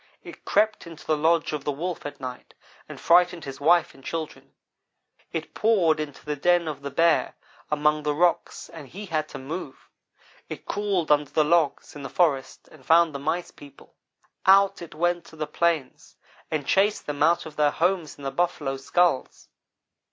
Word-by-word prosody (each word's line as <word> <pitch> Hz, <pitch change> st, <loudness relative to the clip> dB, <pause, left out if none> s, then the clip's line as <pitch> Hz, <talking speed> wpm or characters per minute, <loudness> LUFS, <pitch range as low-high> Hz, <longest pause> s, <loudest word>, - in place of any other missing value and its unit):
It -, -, -12 dB
crept 215 Hz, -4 st, +1 dB
into 165 Hz, -2 st, -12 dB
the 155 Hz, -, +2 dB
lodge 160 Hz, +1 st, +1 dB
of 150 Hz, -2 st, -3 dB
the 145 Hz, -, -1 dB
Wolf 165 Hz, +3 st, -4 dB
at 145 Hz, -, -10 dB
night 125 Hz, -1 st, -8 dB, 0.3 s
and -, -, -9 dB
frightened 175 Hz, 0 st, +3 dB
his 135 Hz, 0 st, -8 dB
wife 170 Hz, +2 st, +3 dB
and 135 Hz, -, -18 dB
children. 160 Hz, +1 st, -6 dB, 0.8 s
It -, -, -5 dB
poured 185 Hz, -8 st, +2 dB
into 150 Hz, -2 st, -6 dB
the 150 Hz, 0 st, -2 dB
den 175 Hz, +3 st, +2 dB
of 150 Hz, -2 st, -5 dB
the 140 Hz, -, -5 dB
Bear 165 Hz, +3 st, +2 dB, 0.3 s
among 150 Hz, 0 st, +1 dB
the 150 Hz, -1 st, -1 dB
rocks 175 Hz, +2 st, 0 dB
and 160 Hz, -4 st, -11 dB
he 200 Hz, +10 st, -9 dB
had 155 Hz, -4 st, -2 dB
to -, -, -8 dB
move. 150 Hz, +7 st, -8 dB, 0.6 s
It -, -, -8 dB
crawled 200 Hz, -6 st, -1 dB
under 145 Hz, -1 st, +3 dB
the 155 Hz, -, +2 dB
logs 160 Hz, -1 st, +1 dB
in 145 Hz, -, -8 dB
the 135 Hz, -, -6 dB
forest 145 Hz, -7 st, 0 dB
and 150 Hz, -4 st, -17 dB
found 165 Hz, +2 st, +4 dB
the 140 Hz, -, -5 dB
Mice 160 Hz, +5 st, -2 dB
people. 145 Hz, -1 st, -16 dB, 0.5 s
Out 195 Hz, 0 st, +5 dB
it 170 Hz, -3 st, -10 dB
went 175 Hz, +1 st, 0 dB
to 160 Hz, -, -15 dB
the 155 Hz, -, -3 dB
plains 155 Hz, -2 st, -2 dB, 0.3 s
and 155 Hz, -3 st, -2 dB
chased 200 Hz, +6 st, +2 dB
them 145 Hz, -1 st, -5 dB
out 170 Hz, +3 st, +3 dB
of 155 Hz, -1 st, -10 dB
their 150 Hz, -1 st, +3 dB
homes 170 Hz, 0 st, -1 dB
in 145 Hz, -, -13 dB
the 135 Hz, -, -3 dB
buffalo 145 Hz, -3 st, -1 dB
skulls. 170 Hz, +1 st, 0 dB
155 Hz, 185 wpm, -25 LUFS, 145-175 Hz, 0.8 s, Out